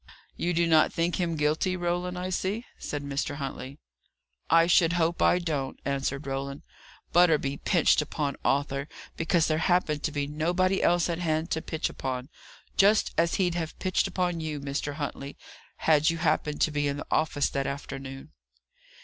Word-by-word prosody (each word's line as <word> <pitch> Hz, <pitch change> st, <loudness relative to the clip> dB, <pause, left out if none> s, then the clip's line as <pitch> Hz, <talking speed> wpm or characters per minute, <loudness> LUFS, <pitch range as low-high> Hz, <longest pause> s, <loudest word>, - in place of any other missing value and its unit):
"You 175 Hz, 0 st, -1 dB
do 170 Hz, 0 st, +3 dB
not 160 Hz, -2 st, +4 dB
think 170 Hz, +1 st, 0 dB
him 170 Hz, -2 st, -1 dB
guilty, 155 Hz, +5 st, +1 dB
Roland, 175 Hz, +1 st, -2 dB
I 180 Hz, +1 st, -3 dB
see," 200 Hz, +6 st, -2 dB
said 145 Hz, -1 st, -4 dB
Mr. 140 Hz, 0 st, -2 dB
Huntley. 135 Hz, -1 st, -6 dB, 0.7 s
"I 165 Hz, +1 st, +6 dB
should 170 Hz, -1 st, +4 dB
hope 170 Hz, -1 st, +1 dB
I -, -, +5 dB
don't," 150 Hz, -7 st, -3 dB
answered 140 Hz, 0 st, -2 dB
Roland. 140 Hz, +1 st, -4 dB, 0.5 s
"Butterby 155 Hz, -5 st, +4 dB
pitched 170 Hz, -2 st, +3 dB
upon 145 Hz, -1 st, -2 dB
Arthur, 140 Hz, 0 st, 0 dB, 0.3 s
because 165 Hz, 0 st, +2 dB
there 155 Hz, 0 st, +1 dB
happened 165 Hz, -3 st, +1 dB
to 155 Hz, -, -1 dB
be 145 Hz, -1 st, -1 dB
nobody 175 Hz, +6 st, 0 dB
else 175 Hz, -1 st, +3 dB
at 170 Hz, -1 st, -2 dB
hand 160 Hz, -1 st, -1 dB
to 160 Hz, -, 0 dB
pitch 160 Hz, +1 st, -2 dB
upon; 130 Hz, 0 st, -4 dB, 0.5 s
just 205 Hz, +2 st, +4 dB
as 170 Hz, 0 st, +2 dB
he'd 180 Hz, -3 st, +1 dB
have 165 Hz, -2 st, -4 dB
pitched 185 Hz, -1 st, +1 dB
upon 180 Hz, -2 st, -1 dB
you, 155 Hz, -2 st, -4 dB
Mr. 140 Hz, +1 st, -3 dB
Huntley, 140 Hz, -1 st, -5 dB, 0.4 s
had 155 Hz, 0 st, +3 dB
you 165 Hz, -, -1 dB
happened 150 Hz, -2 st, 0 dB
to 155 Hz, -, +3 dB
be 145 Hz, -1 st, 0 dB
in 140 Hz, 0 st, -2 dB
the -, -, -6 dB
office 155 Hz, -3 st, +1 dB
that 135 Hz, 0 st, -1 dB
afternoon." 135 Hz, -1 st, -6 dB
155 Hz, 170 wpm, -27 LUFS, 140-175 Hz, 0.7 s, I